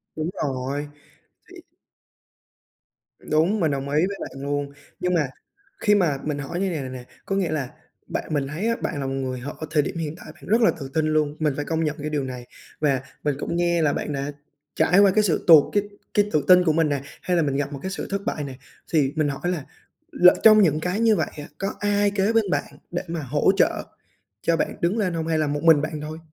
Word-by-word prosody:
Đúng 155 +1 -2
rồi, 140 +1 -3 0.6
thì - - -12 1.6
Đúng, 165 +8 +1
mình 160 -4 +2
đồng 140 0 -3
ý 150 +4 +3
với 200 - -5
bạn 135 - -7
luôn. 145 0 -2 0.3
Nhưng 180 0 0
mà 155 -5 +2 0.5
khi 210 -1 +4
mà 170 -8 +2
mình 150 -1 -2
hỏi 145 +5 -4
như 195 - 0
này 160 -5 -3
này 130 - -5
nè, 130 -1 -8 0.2
có 195 - -1
nghĩa 185 -5 0
là 140 -5 -2 0.4
bạn 155 - -4
mình 140 -2 0
thấy 165 +10 -3
á 230 - +2
bạn 145 - -2
là 135 - -3
một 135 - -2
người 130 -1 -3
hở 140 +4 -6 0.2
thời 150 -3 +3
điểm 170 - -5
hiện 155 -1 -3
tại - - -13
bạn - - -20
rất 225 +4 +3
là 220 - +5
tự 135 -2 -6
tin 160 -1 +1
luôn, 155 -1 +1
mình 150 -3 +1
phải 145 - -3
công 165 +1 -1
nhận 150 +1 -2
cái 150 - -3
điều 145 -2 -1
này. 125 -2 -6 0.3
Và 140 -4 +1 0.2
mình 145 -2 0
cũng 170 - -3
nghe 170 -1 +2
là 150 -2 +2
bạn 150 - -3
đã 140 +1 -3 0.4
trải 180 +3 +4
qua 200 -1 +6
cái 215 - +4
sự 175 -6 +1
tụt 160 -4 +7
cái 205 -1 +2 0.3
cái 205 0 +2
tự 150 - +2
tin 180 -1 +7
của 160 -3 +2
mình 160 -1 +2
nè, 140 -2 -1 0.2
hay 180 -1 0
là 165 - +3
mình 140 -2 -1
gặp 145 +1 -2
một 140 - -6
cái 190 - -4
sự 195 - -5
thất 200 0 -2
bại 155 - -2
nè, 135 -2 -6 0.4
thì 145 -3 +2
mình 155 -2 +1
hỏi 140 - -5
là 165 -6 -3 0.5
lỡ 180 0 +6
trong 215 -1 +8
những 155 -5 +3
cái 180 +6 -2
như 225 -2 +4
vậy - - -1
á, 145 - -7
có 195 - -2
ai 205 0 +2
kế 200 +2 +1
bên 225 -2 +3
bạn - - -1 0.2
để 175 - -2
mà 165 -1 -3
hỗ 145 +6 +2
trợ - - +2 0.6
cho 165 - +2
bạn - - -2
đứng 180 +7 +1
lên 185 -5 0
hông 160 -1 -2
hay 165 -1 +1
là 155 - +1
một 145 +1 -2
mình 160 -3 +6
bạn 155 -1 -4
thôi? 155 +1 -6
155 Hz, 250 wpm, -24 LUFS, 145-180 Hz, 1.6 s, trong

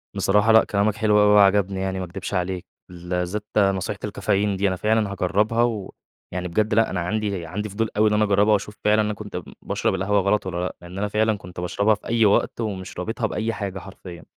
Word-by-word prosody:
بصراحة 105 +3 +3
لأ، 110 0 +7
كلامك 100 +1 0
حلو 105 -1 +3
أوي 105 - +5
وعجبني 100 -1 +4
يعني، 95 0 -2
ما 95 - -3
اكدبش 90 +3 -7
عليك. 90 -1 -2 0.2
بالذات 90 +3 -3
نصيحة 95 -2 +1
الكافيين 100 0 0
دي، 100 - +1
أنا 95 - 0
فعلًا 105 +1 +1
هاجرِّبها. 105 +5 +1
ويعني 95 -5 -5
بجد 105 +5 0
لأ، 115 +1 +3
أنا 90 - -2
عندي 100 -1 -2
عندي 105 +6 -4
فضول 110 +3 -2
أوي 110 0 +4
إن - - 0
أنا 105 0 +3
اجرِّبها 105 +1 +3
وأشوف 105 +1 -1
فعلًا 105 +1 +4
أنا 105 0 -1
كنت 105 -3 -7
ب 90 - -6 0.2
باشرب - - -1
القهوة 100 +2 +1
غلط 100 +1 +1
والّا 90 -2 -4
لأ، 90 - -3
لأن 90 +2 -10
أنا 105 +1 -1
فعلًا 110 0 +1
كنت 90 -1 -10
باشربها 100 +4 +1
في - - -14
أي 115 -1 +3
وقت 105 +3 +2
ومش 95 -4 -5
رابطها 110 +4 -2
بأي 110 +2 -2
حاجة 100 -3 -4
حرفيًا. 90 -2 -11
100 Hz, 215 wpm, -23 LUFS, 95-105 Hz, 0.2 s, لأ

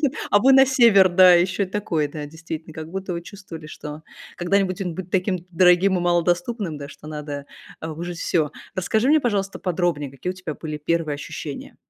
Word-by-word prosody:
вы 290 -3 +2 0.2
а 205 - +6
вы - - +8
на 270 0 +7
север, 230 -7 +6
да, 180 0 +7
ещё 185 +3 +2
и - - 0
такое. 180 -6 -1
Да, 150 0 -6
действительно, 160 +1 -8
как 160 0 -7
будто 190 0 -4
вы 170 0 -4
чувствовали, 175 -5 -10
что 150 0 -8 0.3
когда-нибудь 190 +1 0
он 180 -3 -3
будет 185 -1 -7
таким 185 0 0
дорогим 180 +2 +4
и - - -2
малодоступным, 175 +1 0
да, 140 - -8
что 150 - -13
надо 145 -2 -6 0.3
а 160 - -5
вы 155 - -9
уже 175 0 -4
всё. 165 -2 0 0.2
Расскажи 215 +6 +1
мне, 310 +1 +5
пожалуйста, 200 -5 -1
подробнее, 175 -6 -1
какие 135 +7 -5
у - - -16
тебя 185 -4 -6
были 155 -1 -6
1 160 0 -1
ощущения? 145 0 -7
175 Hz, 200 wpm, -22 LUFS, 155-195 Hz, 0.3 s, вы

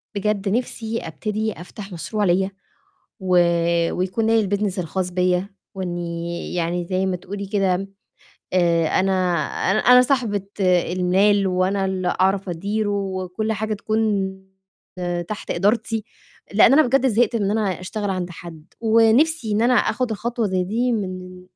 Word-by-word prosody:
بجد 200 0 -1
نِفسي 230 0 -2
أبتدي 215 +6 -3
أفتح 195 +3 -10
مشروع 210 +5 -3
ليّا 190 +2 +2 0.7
و 185 -1 +1 0.6
ويكون 185 +5 -1
ليّا 225 -2 +3
الbusiness 200 -1 -1
الخاص 180 +2 -2
بيّا، 180 +1 +1 0.3
وإنّي 170 -2 -4
يعني 175 0 -1
زَي 185 +1 -1
ما 185 - 0
تقولي 200 +3 -6
كده، 195 -1 0 0.7
آآ 170 -3 +3
أنا 195 +1 +1 0.6
أن - - +2
أنا 250 +3 +6
صاحبة 240 -6 0 0.2
المال، 185 +2 +3
وأنا 190 +1 +1
اللي 185 -1 -1
أعرف 195 0 +1
أديره 205 +5 -2
وكلّ 195 +1 -2
حاجة 220 +1 -2
تكون 205 -3 -1 0.9
تحت 215 - -5
إدارتي، 215 +4 0 0.5
لإن 220 +4 +6
أنا 310 - +7
بجد 270 +1 +3
زهقت 235 -1 +2
إن 205 -3 0
أنا 210 -4 0
أشتغل 205 +2 -4
عند 185 -2 -2
حد، 165 -2 -11 0.2
ونِفسي 230 +4 +3
إن 210 - +1
أنا 245 +2 +4
آخُد 245 -2 +1
خطوة 230 +1 -2
زَي 185 -1 0
دي 235 +6 0
من 185 -3 -5
195 Hz, 140 wpm, -22 LUFS, 185-220 Hz, 0.9 s, أنا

